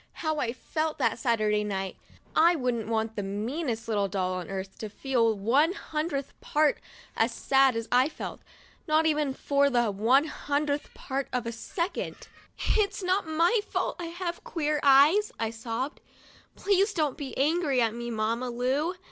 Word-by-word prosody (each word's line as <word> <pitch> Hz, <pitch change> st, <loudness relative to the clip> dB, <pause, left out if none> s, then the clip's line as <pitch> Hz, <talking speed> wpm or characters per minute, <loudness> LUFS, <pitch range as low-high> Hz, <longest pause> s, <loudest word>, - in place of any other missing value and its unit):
How 315 Hz, -2 st, -2 dB
I 230 Hz, -, 0 dB
felt 310 Hz, +5 st, -3 dB
that -, -, +1 dB
Saturday 215 Hz, -4 st, +1 dB
night! 195 Hz, -2 st, -3 dB, 0.4 s
I 340 Hz, +2 st, +6 dB
wouldn't 245 Hz, -6 st, -1 dB
want 220 Hz, 0 st, -1 dB
the 205 Hz, -, -2 dB
meanest 225 Hz, +5 st, -3 dB
little 205 Hz, -3 st, +1 dB
doll 185 Hz, -1 st, -1 dB
on 180 Hz, -2 st, -5 dB
earth 190 Hz, 0 st, -6 dB
to 215 Hz, -, -5 dB
feel 230 Hz, -2 st, +1 dB
one 270 Hz, -, +3 dB
hundredth 305 Hz, -6 st, -3 dB
part 300 Hz, -1 st, +2 dB, 0.4 s
as 225 Hz, +2 st, +2 dB
sad 270 Hz, +1 st, +3 dB
as 230 Hz, 0 st, -3 dB
I 255 Hz, +4 st, +4 dB
felt, -, -, -7 dB, 0.5 s
not 310 Hz, +1 st, +3 dB
even 300 Hz, -3 st, +2 dB
for 280 Hz, 0 st, +2 dB
the 240 Hz, -4 st, +2 dB
one 230 Hz, +8 st, +4 dB
hundredth 290 Hz, -1 st, -2 dB
part 270 Hz, 0 st, -3 dB
of 250 Hz, -2 st, -1 dB
a 230 Hz, -, -2 dB
second. 340 Hz, -, -4 dB, 0.4 s
"It's 405 Hz, -2 st, +1 dB
not 370 Hz, 0 st, +1 dB
my 335 Hz, +8 st, +3 dB
fault -, -, -2 dB
that 345 Hz, -, -4 dB
I -, -, -4 dB
have 345 Hz, 0 st, -5 dB
queer 305 Hz, -2 st, -1 dB
eyes," 290 Hz, +10 st, +6 dB
I 225 Hz, -1 st, -1 dB
sobbed. 230 Hz, +5 st, -4 dB, 0.3 s
" -, -, -28 dB
Please 400 Hz, +1 st, +2 dB
don't 305 Hz, -7 st, 0 dB
be 275 Hz, -3 st, -7 dB
angry 295 Hz, -1 st, +2 dB
at 230 Hz, -2 st, +2 dB
me, 235 Hz, 0 st, -5 dB
Mamma 230 Hz, +2 st, -1 dB
Lu 265 Hz, +8 st, 0 dB
270 Hz, 175 wpm, -28 LUFS, 225-310 Hz, 0.5 s, I